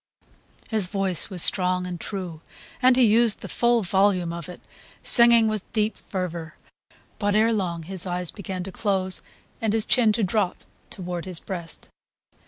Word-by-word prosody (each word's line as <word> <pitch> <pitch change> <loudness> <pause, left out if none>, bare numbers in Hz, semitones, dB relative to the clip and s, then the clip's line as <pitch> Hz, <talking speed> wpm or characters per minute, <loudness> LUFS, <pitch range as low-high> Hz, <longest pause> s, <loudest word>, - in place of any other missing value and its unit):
His 215 -5 +1
voice 195 -2 -2
was 185 -4 +5
strong 180 -1 +4
and 180 -1 -6
true, 180 -6 -6 0.4
and 255 0 +5
he 255 - +3
used 225 0 +3
the - - -7
full 240 -2 +1
volume 185 -2 +1
of 170 -1 -8
it, 180 - -10 0.4
singing 235 -2 +7
with 215 -3 -5
deep 215 0 0
fervour; 175 -4 -6 0.6
but 205 -1 0
ere 225 +2 +3
long 175 -6 -3
his 185 +2 -3
eyes 180 -1 -4
began 190 -2 -6
to 195 - -8
close 190 -2 -2 0.4
and 220 -2 -1
his 220 -1 0
chin 235 -4 +3
to 215 - -1
drop 195 -1 -2 0.3
toward 180 -2 -6
his 180 -3 -6
breast. 170 -4 -8
190 Hz, 165 wpm, -23 LUFS, 180-215 Hz, 0.6 s, singing